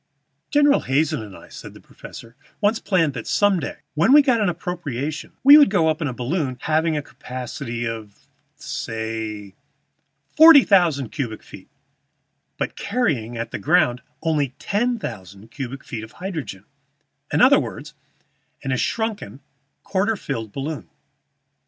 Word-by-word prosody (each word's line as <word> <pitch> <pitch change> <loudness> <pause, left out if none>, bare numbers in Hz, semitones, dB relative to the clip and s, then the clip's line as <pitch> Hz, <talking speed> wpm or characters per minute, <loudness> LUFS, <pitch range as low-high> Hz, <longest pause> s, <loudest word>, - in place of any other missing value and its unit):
"General 290 -1 +4
Hazen 150 +1 0
and 105 -3 -10
I," - - -15
said - - -11
the - - -13
professor, 115 +1 -13 0.2
"once 215 +2 +1
planned 165 -7 +1
that 115 -3 -7
some 205 -3 +2
day, 145 - -6
when 165 - +3
we 295 0 +8
got 250 -5 +2
an 205 - +2
appropriation, 155 -5 -5
we 285 +3 +10
would 290 - +6
go 175 -6 +2
up 155 +1 -1
in 150 - 0
a - - -2
balloon 130 +2 -2
having 160 0 +1
a 150 - -3
capacity 125 -2 -6
of, 110 -3 -8 0.3
say, 110 -3 -5 0.8
forty 315 -3 +9
thousand 165 - +2
cubic 115 -4 -5
feet, - - -14 0.9
but - - -3
carrying 140 - -1
at 115 0 -5
the - - -4
ground 145 -7 +2 0.2
only 150 -5 0
ten 235 +4 -1
thousand 100 - -9
cubic 135 -1 -6
feet 110 -2 -6
of 110 - -11
hydrogen 155 - -6 0.7
in - - +1
other - - +7
words, - - -7 0.7
in 135 - -2
a 130 - +1
shrunken, 220 - -3 0.4
quarter 200 +3 0
filled 115 - -5
balloon. 135 - -5
145 Hz, 150 wpm, -22 LUFS, 115-190 Hz, 0.9 s, we